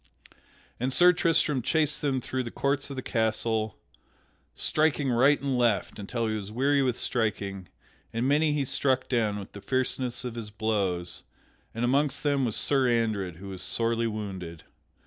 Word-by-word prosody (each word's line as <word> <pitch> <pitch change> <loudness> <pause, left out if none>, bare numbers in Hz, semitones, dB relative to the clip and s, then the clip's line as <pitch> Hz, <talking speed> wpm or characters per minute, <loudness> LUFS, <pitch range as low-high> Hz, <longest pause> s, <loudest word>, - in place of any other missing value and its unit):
And 125 +2 0
Sir 180 +6 +6
Tristram 160 -5 +2
chased 150 +4 +1
them 135 -3 0
through 130 +2 -2
the 120 - -4
courts 140 +3 -1
of 140 - -5
the 130 - -5
castle, 110 -2 0 0.8
striking 150 -3 +1
right 135 +5 +4
and 135 -2 -1
left 115 -4 +1
until 115 +3 -2
he 110 - -1
was 105 -1 -5
weary 140 +5 +2
with 125 -2 +1
striking, 100 -5 -2 0.4
and 115 +3 -1
many 150 +2 +3
he 145 -2 0
struck 130 0 +1
down 110 -5 +1
with 100 -1 -8
the 100 - -10
fierceness 125 +1 -2
of 125 - -4
his 115 -2 -6
blows, 100 -5 -1 0.5
and 115 +1 0
amongst 140 +3 +1
them 140 -3 +2
was 115 - -1
Sir 135 -3 +2
Andred 110 -7 0
who 100 +4 -9
was 95 -2 -7
sorely 115 0 +1
wounded. 95 -6 -6
120 Hz, 165 wpm, -28 LUFS, 105-135 Hz, 0.8 s, Sir